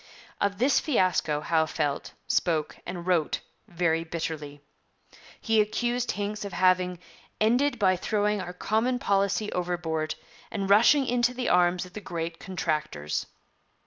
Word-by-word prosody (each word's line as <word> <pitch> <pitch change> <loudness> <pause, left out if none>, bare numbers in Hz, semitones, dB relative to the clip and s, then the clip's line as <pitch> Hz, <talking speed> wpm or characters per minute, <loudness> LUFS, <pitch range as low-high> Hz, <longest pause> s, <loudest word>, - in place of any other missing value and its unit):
Of 200 0 +1
this 260 +6 +3
fiasco 185 - +1
Howe 160 0 +2
felt, 145 -3 -2
spoke, 160 -4 0
and 175 -2 -5
wrote 175 -4 +1 0.3
very 165 -3 0
bitterly. 160 -3 -5 0.8
He 225 -1 +3
accused 240 +3 -1
Hincks 210 +1 -3
of 200 - -6
having 185 -1 +2 0.4
'ended 245 +5 +2
by 190 -4 +3
throwing 210 +1 0
our 180 -1 -5
common 225 +7 0
policy 200 -2 +1
overboard, 170 -3 -2 0.3
and 200 -2 -2
rushing 250 +7 +6
into 245 0 +1
the 250 0 -1
arms 180 0 +3
of 180 - -14
the 210 - -7
great 165 -2 -4
contractors.' 155 - -2
185 Hz, 135 wpm, -27 LUFS, 165-215 Hz, 0.8 s, rushing